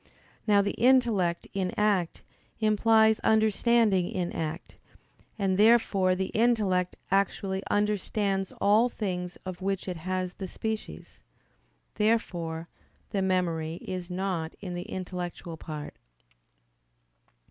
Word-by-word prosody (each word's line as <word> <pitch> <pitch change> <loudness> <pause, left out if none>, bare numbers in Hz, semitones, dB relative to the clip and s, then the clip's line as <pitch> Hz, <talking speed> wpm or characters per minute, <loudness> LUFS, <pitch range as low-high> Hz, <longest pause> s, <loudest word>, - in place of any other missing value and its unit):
Now 205 -1 +5
the 200 - -1
intellect 230 -9 +3
in 190 -2 -1
act 200 -5 +1 0.4
implies 220 0 +4
understanding 220 -3 +3
in 180 -2 -2
act; 160 +2 -5 0.6
and 195 -2 0
therefore 205 -4 +4
the 190 +1 -2
intellect 210 -6 +2 0.2
actually 195 0 0
understands 205 -1 0
all 215 +4 +4
things 180 -6 -4
of 185 0 -6
which 195 0 -2
it 180 -2 -3
has 185 +2 -3
the 190 - -6
species. 220 +3 -6 0.7
Therefore 175 -7 -1 0.4
the 195 - 0
memory 170 -4 0
is 180 0 -6
not 180 -3 -3
in 185 -3 -6
the 175 0 -6
intellectual 180 -2 -5
part. 155 -2 -7
190 Hz, 110 wpm, -28 LUFS, 180-210 Hz, 0.7 s, Now